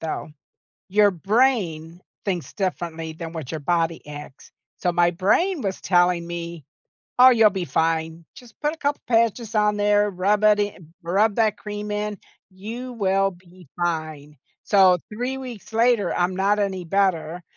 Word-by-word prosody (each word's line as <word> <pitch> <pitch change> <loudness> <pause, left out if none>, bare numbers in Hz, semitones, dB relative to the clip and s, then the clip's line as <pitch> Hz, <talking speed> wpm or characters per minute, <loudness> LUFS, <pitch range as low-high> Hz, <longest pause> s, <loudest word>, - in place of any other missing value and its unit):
though. 160 -1 -4 0.6
Your 205 +1 +4
brain 180 -5 0 0.2
thinks 180 -5 -3
differently 170 -5 -3
than 165 0 -8
what 160 -4 -6
your 155 - -4
body 165 +1 -1
acts. 145 -2 -10 0.3
So, 180 - 0
my 175 0 +2
brain 305 - +1
was 195 -2 -3
telling 175 -2 +2
me, 170 -3 -6 0.5
"Oh, 255 +1 +9
you'll 225 -3 +5
be 190 -3 -3
fine. 160 +2 -1
Just 240 -3 -15
put 300 +1 0
a - - -9
couple 285 -1 -1
patches 230 -1 +1
on 210 0 +2
there, 205 0 +3
rub 200 +3 0
it 210 -1 +5
i 205 0 -2 0.2
rub 200 +5 +2
that 220 -2 +2
cream 210 0 -6
in. 210 0 -2 0.3
You 225 +7 -7
will 195 -3 +1
be 180 -1 -18
fine." 155 -4 -3 0.3
So, 185 -3 +5
3 250 +4 -3
weeks 245 -5 -9
later, 230 -1 +2
I'm 180 +1 0
not 205 +2 +2
any 190 -3 -2
better, 175 -2 0
190 Hz, 155 wpm, -23 LUFS, 170-210 Hz, 0.6 s, Oh